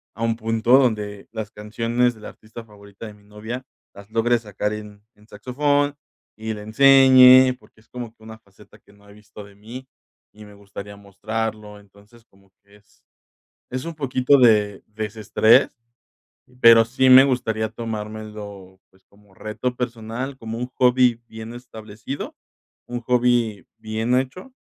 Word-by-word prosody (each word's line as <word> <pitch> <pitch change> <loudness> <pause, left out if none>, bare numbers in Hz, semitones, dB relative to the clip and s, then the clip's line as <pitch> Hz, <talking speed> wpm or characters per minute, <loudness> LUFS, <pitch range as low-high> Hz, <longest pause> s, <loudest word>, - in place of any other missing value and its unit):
a 115 - -5
un 115 -1 0
punto 115 +3 +2
donde 105 -5 -2
las 110 -2 -6
canciones 115 +3 -1
de 110 - -17
la - - -8
artista 110 +2 -13
favorita 100 0 -14
de 105 - -10
mi 105 0 -22
novia 110 +5 -8 0.3
las 100 +1 -14
logre 120 +1 +1
sacar 105 -1 -4
en 105 -1 -10
en 105 0 -24
saxofón 145 +6 -1 0.4
y 110 0 -5
le 105 - -9
enseñe, 130 +1 +6
porque 110 - -24
es - - -30
como 120 -2 -8
que 110 - -23
una 110 0 -11
faceta 100 0 -21
que 100 - -24
no 100 0 -23
he - - -15
visto 105 0 -14
de 100 0 -17
mí 120 +6 -11 0.5
y 105 0 -14
me 105 - -15
gustaría 100 0 -11
mostrarlo. 105 +1 -6
Entonces, 105 +3 -22
como 95 -2 -28
que 100 +1 -22
es 105 - -31 0.7
es 130 +3 -5
un 170 - -7
poquito 135 -1 +2
de 105 -5 +3
desestrés. 110 +1 +1 0.8
Pero 115 -1 +7
sí 130 +3 +1
me 130 +1 +9
gustaría 110 -4 -1
tomármelo, 105 -4 -8
pues 95 0 -29
como 100 -1 -25
reto 125 +5 -5
personal, 120 +2 -5
como 115 -1 -7
un 125 - -3
hobby 125 -2 +3
bien 110 +1 -9
establecido, 110 +1 -9 0.5
un 120 0 -5
hobby 120 -4 0
bien 110 +3 -2
hecho 185 - -6
110 Hz, 160 wpm, -21 LUFS, 105-125 Hz, 0.8 s, me